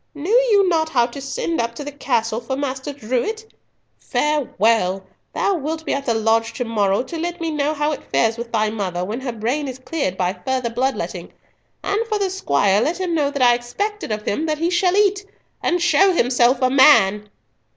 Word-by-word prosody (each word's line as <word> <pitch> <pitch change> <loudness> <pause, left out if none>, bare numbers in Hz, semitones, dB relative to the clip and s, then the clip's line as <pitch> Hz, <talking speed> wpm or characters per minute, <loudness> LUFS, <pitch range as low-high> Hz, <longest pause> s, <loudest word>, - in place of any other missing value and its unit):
Knew 335 +10 -1 0.2
you 400 -2 +4
not 320 -3 +1
how 245 -6 +3
to 255 +3 -8
send 275 +2 -2
up 235 0 -4
to 290 - -6
the 290 - -6
castle 235 -5 -1
for 255 +3 -4
Master 270 0 -3
Drewitt? 285 - -3 0.5
Farewell! 225 -10 0 0.3
Thou 400 - 0
wilt 320 -1 -4
be - - -1
at 275 0 -3
the 230 - +2
lodge 225 +1 +1
to 245 +2 -3
morrow 205 -2 +1
to 330 +4 -7
let 345 +1 -4
me 330 -1 -2
know 300 0 -1
how 295 +1 0
it 300 - -7
fares 225 0 +2
with 235 0 -7
thy 215 0 +1
mother, 185 -5 -3
when 220 +6 -4
her 260 -2 -3
brain 240 +6 -2
is 260 -1 -6
cleared 260 - -3
by 180 0 0
further 235 +6 -3
blood 260 +3 0
letting. - - -6 0.5
And 410 +3 0
for 430 -2 0
the 390 -2 -1
squire, 200 - +2
let 330 +8 -1
him 365 -2 -2
know 295 -3 +1
that 280 -2 -1
I 245 -1 +6
expect 405 - -3
it - - -5
of 210 0 -3
him 310 +10 -1
that 305 -1 -1
he 335 +3 0
shall 360 +1 +2
eat, 405 -1 +2 0.4
and 355 0 +1
show 380 +3 +4
himself 245 -3 +2
a 255 - +3
man!" 210 -7 +5
265 Hz, 215 wpm, -20 LUFS, 225-325 Hz, 0.5 s, I